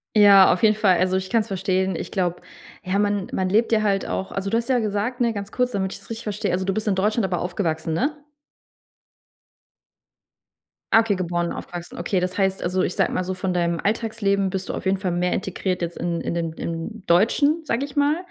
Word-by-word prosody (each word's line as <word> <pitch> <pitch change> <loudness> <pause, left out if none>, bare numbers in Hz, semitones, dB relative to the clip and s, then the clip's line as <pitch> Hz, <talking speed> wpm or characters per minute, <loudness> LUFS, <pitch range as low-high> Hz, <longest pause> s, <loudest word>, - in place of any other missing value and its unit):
Ja, 200 -2 +8
auf 180 - 0
jeden 215 -1 +5
Fall. 200 -4 +3
Also 185 +1 +2
ich 190 0 -2
kann's 230 -2 +1
verstehen. 190 -1 0
Ich - - -5
glaube, 180 -3 -1 0.4
ja, 190 +1 0
man 205 -2 0
man 185 - 0
lebt 220 +5 +2
ja 220 -1 +3
halt 200 -2 +1
auch 190 - -4
also, 195 0 -2
du 225 - +2
hast 235 0 -2
ja 255 -2 +2
gesagt, 220 +4 -2
ne, 235 -1 +3
ganz 200 -1 -6
kurz, 250 0 +1
damit 190 -2 -2
ich's - - -12
richtig 230 0 -6
verstehe, 210 -1 -2
also 185 +1 -1
du 195 - 0
bist 215 +2 -3
in 195 - +1
Deutschland 210 +4 +1
aber 180 -2 -1
aufgewachsen, 170 -3 -2
ne? 285 - 0 2.8
Ah, 225 - +8
okay, 225 -3 +1
geboren 175 -1 -1
und - - -4
aufgewachsen, 175 0 -8
okay. 180 +2 0
Das 180 +2 -2
heißt 190 -1 +1
also, 180 +1 0
ich 180 - -1
sage - - +2
mal 185 - 0
so, 185 +1 -3
von 185 0 -2
deinem 170 -1 0
Alltagsleben 205 -2 0
bist 190 0 -4
du - - -3
auf - - -5
jeden 190 0 +1
Fall 190 -2 -2
mehr 180 +1 0
integriert 185 -1 -2
jetzt 170 0 -3
in 170 -1 -2
in - - -3
den 170 -1 -2
im 170 +6 -6
Deutschen, 285 - +3
sage 275 -3 -1
ich 285 0 -12
mal, 290 +2 +3
195 Hz, 225 wpm, -23 LUFS, 180-215 Hz, 2.8 s, Ja